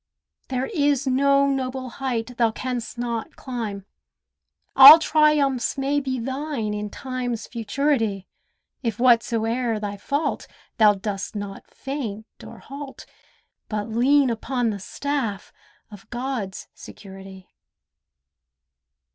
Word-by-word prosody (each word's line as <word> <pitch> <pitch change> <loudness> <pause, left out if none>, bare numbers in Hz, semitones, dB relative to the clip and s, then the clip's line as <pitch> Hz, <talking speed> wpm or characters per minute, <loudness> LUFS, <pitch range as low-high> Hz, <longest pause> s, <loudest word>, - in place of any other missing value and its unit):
There 260 0 -2
is 285 -4 +1
no 275 +1 +3
noble 260 -1 -2
height 245 -2 -2
thou 230 -2 +3
canst 245 +1 -5
not 235 -2 -4
climb. 220 -7 -5 0.9
All 275 +4 +12
triumphs 300 -6 +2
may 275 +2 +1
be 260 -2 -3
thine 260 -3 -3
in 210 0 -4
Time's 250 -2 -4
futurity, 225 -3 -1 0.6
If 230 -4 -2
whatso'er 230 -1 +2
thy 205 -1 -5
fault, 285 +9 -2 0.3
thou 210 -2 +6
dost 195 +1 -5
not 205 -1 -7
faint 235 -7 -5 0.2
or - - -11
halt, 275 0 -10 0.6
But 210 0 -3
lean 260 +4 +3
upon 240 0 -1
the 200 - -5
staff 230 -2 -4 0.4
of 205 -2 -13
God's 240 -6 -4
security. 190 -1 -12
245 Hz, 110 wpm, -23 LUFS, 215-270 Hz, 0.9 s, All